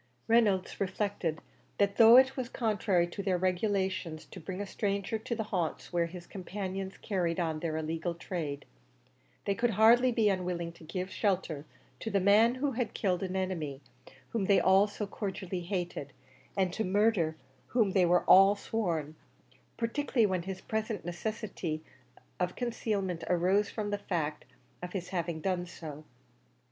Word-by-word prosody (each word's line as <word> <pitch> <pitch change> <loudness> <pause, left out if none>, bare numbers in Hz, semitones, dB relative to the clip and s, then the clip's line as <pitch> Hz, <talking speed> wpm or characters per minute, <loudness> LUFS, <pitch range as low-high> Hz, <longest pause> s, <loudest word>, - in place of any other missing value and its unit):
Reynolds 210 -5 +3
reflected 195 -4 -1 0.4
that 200 -1 +2
though 230 +1 +9
it 265 0 +5
was 255 -2 -3
contrary 205 -7 +1
to 175 +3 -6
their 190 -2 +1
regulations 185 -3 -1
to 185 - -8
bring 185 +3 -6
a 205 - -2
stranger 200 +2 -2
to 235 +2 -3
the 220 - -2
haunts 180 -5 -3
where 170 -1 +2
his 175 0 -9
companions 190 0 -5
carried 180 -4 -1
on 160 -3 -1
their 160 -1 -2
illegal 165 +2 -2
trade, 155 -5 -4 0.8
they 200 - +2
could 240 +4 +1
hardly 230 +4 +5
be 225 -2 +2
unwilling 180 -3 -1
to 170 - -16
give 180 +4 -4
shelter 180 -7 -1 0.3
to 225 - -4
the 200 -2 +2
man 210 +5 +5
who 275 +2 0
had 240 -2 -2
killed 185 -4 +1
the 190 - -3
enemy 165 -8 -2 0.5
whom 220 -4 -1
they 195 0 +5
all 190 +2 +5
so 210 0 -4
cordially 190 -3 -4
hated, 175 -6 -4 0.4
and 185 -2 +1
to 220 - -1
murder 195 -5 +2 0.3
whom 225 -5 +2
they 185 -1 +4
were 175 +1 +4
all 195 +2 +7
sworn; 170 -8 -2 0.6
particularly 235 0 +1
when 185 -3 0
his 190 +1 -6
present 220 -4 -3
necessity 175 -3 -4 0.6
of 180 0 -1
concealment 205 -8 -2
arose 185 +4 +3
from 210 -2 -3
the 205 - -1
fact 155 -6 -2 0.4
of 180 0 -6
his 180 -2 -4
having 170 -3 -2
done 180 -1 -1
so. 155 -4 -8
190 Hz, 160 wpm, -31 LUFS, 175-210 Hz, 0.8 s, though